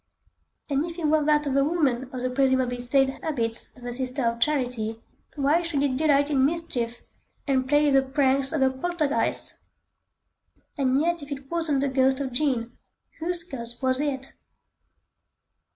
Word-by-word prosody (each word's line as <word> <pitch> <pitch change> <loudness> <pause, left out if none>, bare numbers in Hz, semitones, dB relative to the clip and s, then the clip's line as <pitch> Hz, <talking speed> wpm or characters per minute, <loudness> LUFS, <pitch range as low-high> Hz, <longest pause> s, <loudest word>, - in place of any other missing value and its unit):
And 280 0 0
if 335 - -10
it 335 - -3
were 305 0 +3
that 300 0 +3
of 275 -2 -1
a 275 - +4
woman 275 -5 0
of 255 -1 -5
the 255 - -1
presumably 260 -2 +1
staid 265 +2 +2
habits 235 -8 -1
of 245 - -12
a 245 - -3
Sister 255 +1 -1
of 230 0 0
Charity, 245 -5 -1 0.4
why 295 +4 +2
should 320 -5 -1
it 270 -3 +1
delight 285 0 +2
in 270 -2 +3
mischief 265 -7 -1 0.4
and 260 -2 0
play 295 0 +4
the 270 0 +5
pranks 270 0 +2
of 305 -4 +1
a 265 - +3
poltergeist? 305 +1 -1 1.2
And 270 -2 +2
yet 340 +1 0
if 285 0 -10
it 275 0 -7
wasn't 325 -5 0
the 280 - +1
ghost 265 0 +2
of 270 -2 -3
Jean, 245 -3 -1 0.4
whose 340 +1 -2
ghost 240 -6 -8
was 260 +1 +1
it? 275 -2 -3
275 Hz, 170 wpm, -25 LUFS, 255-300 Hz, 1.2 s, the